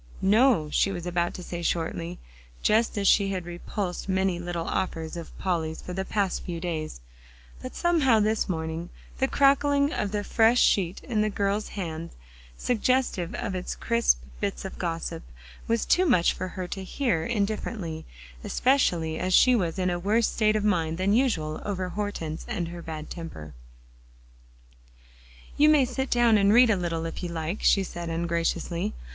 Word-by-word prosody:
"No," 210 Hz, -, +4 dB
she 195 Hz, -, +2 dB
was 175 Hz, -3 st, -5 dB
about 175 Hz, -1 st, -1 dB
to 180 Hz, -, -7 dB
say 175 Hz, 0 st, -5 dB
shortly, 170 Hz, +1 st, -2 dB, 0.5 s
just 220 Hz, +1 st, +2 dB
as 200 Hz, -1 st, +1 dB
she 200 Hz, 0 st, +4 dB
had 185 Hz, -3 st, -3 dB
repulsed 180 Hz, +2 st, -4 dB
many 190 Hz, -2 st, +1 dB
little 175 Hz, -1 st, -4 dB
offers 165 Hz, -3 st, -2 dB
of 170 Hz, -1 st, -8 dB
Polly's 165 Hz, -4 st, -2 dB
for 180 Hz, -, -7 dB
the 190 Hz, +1 st, -2 dB
past 195 Hz, -2 st, -1 dB
few 170 Hz, -2 st, -5 dB
days; 160 Hz, -, -4 dB, 0.6 s
but 255 Hz, -, -7 dB
somehow 305 Hz, -10 st, +3 dB
this 215 Hz, 0 st, +1 dB
morning 160 Hz, 0 st, -3 dB, 0.3 s
the 265 Hz, -, +3 dB
crackling 280 Hz, +2 st, +3 dB
of 205 Hz, -, -2 dB
the 205 Hz, -1 st, -1 dB
fresh 230 Hz, +3 st, +3 dB
sheet 185 Hz, -2 st, +2 dB
in 220 Hz, -4 st, 0 dB
the 215 Hz, -, +1 dB
girl's 200 Hz, +1 st, -1 dB
hand, 165 Hz, -3 st, -4 dB, 0.5 s
suggestive 245 Hz, -7 st, 0 dB
of 190 Hz, -, -3 dB, 0.2 s
crisp -, -, +2 dB, 0.2 s
bits -, -, -3 dB
of -, -, -7 dB
gossip, -, -, -3 dB, 0.5 s
was 230 Hz, -1 st, +1 dB
too 370 Hz, 0 st, +3 dB
much 180 Hz, -, +4 dB
for 185 Hz, -, -4 dB
her 185 Hz, 0 st, -5 dB
to 195 Hz, -, -5 dB
hear 190 Hz, -, 0 dB
indifferently, 200 Hz, -6 st, -2 dB, 0.4 s
especially 175 Hz, -, +1 dB
as 185 Hz, 0 st, +2 dB
she 255 Hz, -1 st, +6 dB
was 175 Hz, -6 st, -1 dB
in 185 Hz, -1 st, +1 dB
a 175 Hz, -, -2 dB
worse 215 Hz, +5 st, +2 dB
state 215 Hz, -1 st, +1 dB
of 215 Hz, -, 0 dB
mind 165 Hz, -6 st, +1 dB
than 190 Hz, +2 st, +1 dB
usual 195 Hz, -12 st, +1 dB
over 190 Hz, -3 st, -3 dB
Hortense 180 Hz, -5 st, -4 dB
and 170 Hz, -1 st, -3 dB
her 175 Hz, 0 st, -7 dB
bad 155 Hz, -2 st, -7 dB
temper. 75 Hz, -, -8 dB, 2.0 s
"You 300 Hz, +1 st, +6 dB
may 295 Hz, -4 st, +5 dB
sit 265 Hz, +2 st, -3 dB
down 235 Hz, -3 st, +4 dB
and 200 Hz, 0 st, +4 dB
read 240 Hz, +1 st, +6 dB
a -, -, +3 dB
little, 165 Hz, -3 st, -2 dB
if 165 Hz, -, -5 dB
you 175 Hz, -, -3 dB
like," 170 Hz, +3 st, -3 dB
she 195 Hz, -, +4 dB
said 175 Hz, -2 st, -6 dB
ungraciously. 170 Hz, -, -1 dB
185 Hz, 170 wpm, -26 LUFS, 170-215 Hz, 2.0 s, she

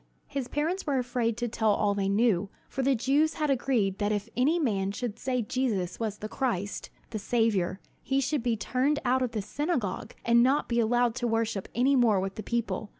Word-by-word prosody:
His 275 Hz, -3 st, -4 dB
parents 320 Hz, +8 st, -2 dB
were 280 Hz, -2 st, +1 dB
afraid 245 Hz, -2 st, -1 dB
to 240 Hz, 0 st, -1 dB
tell 220 Hz, -1 st, +1 dB
all 205 Hz, 0 st, +1 dB
they 195 Hz, -1 st, 0 dB
knew; 200 Hz, -2 st, +2 dB, 0.2 s
for 270 Hz, -, -3 dB
the 270 Hz, +1 st, +3 dB
Jews 285 Hz, +6 st, +2 dB
had 300 Hz, -2 st, 0 dB
agreed 235 Hz, -7 st, +1 dB
that 205 Hz, 0 st, +1 dB
if 210 Hz, +1 st, -2 dB
any 285 Hz, +8 st, +3 dB
man 200 Hz, -, 0 dB
should 225 Hz, +1 st, -4 dB
say 250 Hz, -2 st, -1 dB
Jesus 210 Hz, -6 st, -1 dB
was 215 Hz, -3 st, -2 dB
the 215 Hz, -, -5 dB
Christ, 210 Hz, -5 st, -2 dB, 0.2 s
the 215 Hz, -, -3 dB
Saviour, 205 Hz, -4 st, +1 dB, 0.2 s
he 270 Hz, +1 st, 0 dB
should 275 Hz, +1 st, 0 dB
be 235 Hz, -1 st, 0 dB
turned 260 Hz, +7 st, +1 dB
out 255 Hz, +1 st, +2 dB
of 250 Hz, -2 st, -1 dB
the 215 Hz, -3 st, -2 dB
synagogue, 260 Hz, -, -2 dB
and 235 Hz, 0 st, +5 dB
not 265 Hz, +4 st, +3 dB
be 235 Hz, 0 st, +1 dB
allowed 240 Hz, +1 st, +2 dB
to 240 Hz, -, 0 dB
worship 225 Hz, -3 st, -1 dB
any 260 Hz, +4 st, +3 dB
more 230 Hz, -6 st, +4 dB
with 190 Hz, 0 st, -3 dB
the 215 Hz, -, -6 dB
people. 235 Hz, -2 st, -2 dB
235 Hz, 210 wpm, -28 LUFS, 210-260 Hz, 0.2 s, and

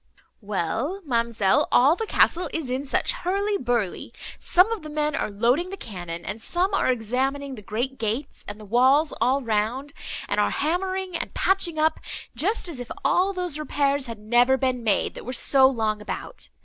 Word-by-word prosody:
"Well, 220 Hz, -, -2 dB
ma'amselle, 235 Hz, 0 st, +1 dB
all 275 Hz, +6 st, +5 dB
the 445 Hz, +3 st, -4 dB
castle 360 Hz, -2 st, +3 dB
is 305 Hz, -6 st, -3 dB
in 265 Hz, +2 st, -3 dB
such -, -, +1 dB
hurly 405 Hz, -3 st, -1 dB
burly. 240 Hz, -, -2 dB, 0.3 s
Some 365 Hz, +5 st, +3 dB
of 450 Hz, -4 st, -2 dB
the 305 Hz, -, -9 dB
men 300 Hz, 0 st, -1 dB
are -, -, -1 dB
loading 240 Hz, -, +1 dB
the 390 Hz, -, -6 dB
cannon, 175 Hz, -, -7 dB
and 210 Hz, +3 st, -5 dB
some 365 Hz, -, -1 dB
are 325 Hz, -, +2 dB
examining 265 Hz, +4 st, -2 dB
the 225 Hz, -, -9 dB
great 240 Hz, +6 st, -3 dB
gates, 230 Hz, +6 st, -3 dB
and 205 Hz, +1 st, -7 dB
the 215 Hz, -, -11 dB
walls 260 Hz, +8 st, +3 dB
all 260 Hz, +4 st, +2 dB
round, 230 Hz, +6 st, -1 dB, 0.3 s
and 205 Hz, -, 0 dB
are 205 Hz, -, +3 dB
hammering 370 Hz, +3 st, -2 dB
and -, -, -4 dB
patching 365 Hz, -4 st, +2 dB
up, 310 Hz, +1 st, +2 dB, 0.4 s
just 375 Hz, -, 0 dB
as 315 Hz, -7 st, -6 dB
if 245 Hz, -, -7 dB, 0.2 s
all 360 Hz, +7 st, +3 dB
those 360 Hz, -5 st, -2 dB
repairs 285 Hz, -2 st, 0 dB
had 230 Hz, -1 st, -6 dB
never 240 Hz, +5 st, +3 dB
been 255 Hz, -2 st, -1 dB
made, 210 Hz, -3 st, +1 dB
that -, -, -9 dB
were 255 Hz, -, -5 dB
so 265 Hz, +2 st, +6 dB
long 220 Hz, -5 st, -1 dB
about. 355 Hz, -, -7 dB
265 Hz, 185 wpm, -24 LUFS, 225-330 Hz, 0.4 s, so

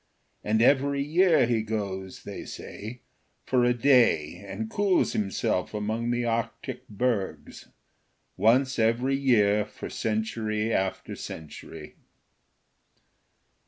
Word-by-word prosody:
And 110 Hz, +2 st, +2 dB
every 140 Hz, +1 st, +3 dB
year 165 Hz, 0 st, +4 dB
he 115 Hz, -2 st, +1 dB
goes, 100 Hz, -4 st, -4 dB
they -, -, -7 dB
say, 115 Hz, +4 st, -8 dB, 0.4 s
for 125 Hz, -2 st, +2 dB
a 120 Hz, -, +4 dB
day 115 Hz, -, +3 dB
and 100 Hz, +3 st, -5 dB
cools 195 Hz, -, +1 dB
himself 100 Hz, -1 st, -1 dB
among 110 Hz, +3 st, -2 dB
the 120 Hz, 0 st, 0 dB
Arctic 115 Hz, 0 st, -3 dB
bergs; 105 Hz, -2 st, -2 dB, 0.7 s
once 130 Hz, +3 st, +3 dB
every 120 Hz, +4 st, +2 dB
year 105 Hz, -7 st, +3 dB
for -, -, -9 dB
century 110 Hz, 0 st, -1 dB
after 95 Hz, 0 st, -2 dB
century. 80 Hz, 0 st, -9 dB
115 Hz, 105 wpm, -27 LUFS, 105-125 Hz, 0.7 s, year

